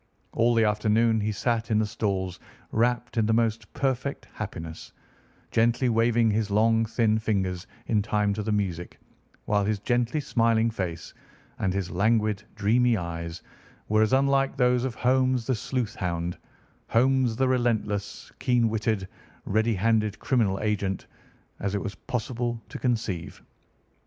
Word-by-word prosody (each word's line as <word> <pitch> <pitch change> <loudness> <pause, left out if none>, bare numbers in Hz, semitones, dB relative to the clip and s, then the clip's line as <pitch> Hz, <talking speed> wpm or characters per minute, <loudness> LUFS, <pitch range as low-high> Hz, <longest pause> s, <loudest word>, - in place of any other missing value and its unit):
All 120 +1 +2
the 115 - +4
afternoon 110 +2 +2
he 105 +1 0
sat 115 +2 -1
in 110 - +2
the 110 - +2
stalls 95 -4 -2 0.3
wrapped 120 +1 0
in 110 -2 +3
the 110 - +2
most 115 -1 0
perfect 135 0 -2
happiness, 85 -6 -7 0.6
gently 120 +2 +2
waving 115 0 +3
his 105 0 0
long, 115 +2 +3
thin 110 -1 +1
fingers 95 -4 -1 0.2
in 105 -2 +2
time 105 -1 +1
to 105 - -3
the 110 +1 -2
music, 95 -5 -2 0.5
while 105 -1 +2
his 105 +1 0
gently 120 +6 0
smiling 115 -4 +2
face 85 -6 -5 0.5
and 95 - +1
his 95 -2 -2
languid, 105 +2 +1
dreamy 115 +3 +3
eyes 85 -1 -5 0.5
were 110 +1 +3
as 110 - +3
unlike 135 0 +2
those 125 -1 +3
of 125 -2 -3
Holmes 130 -1 +2
the 130 - +1
sleuth 125 -1 -2
hound, 85 -1 -2 0.5
Holmes 130 0 +2
the 130 +2 +2
relentless, 110 -5 -1
keen 125 -3 +2
witted, 110 -3 -1 0.4
ready 110 +2 +1
handed 110 +1 +1
criminal 110 -7 +1
agent, 100 -3 -1 0.5
as 100 +1 -2
it - - 0
was 100 - -4
possible 120 0 -3
to - - -7
conceive. 110 -9 -2
110 Hz, 145 wpm, -26 LUFS, 100-120 Hz, 0.6 s, the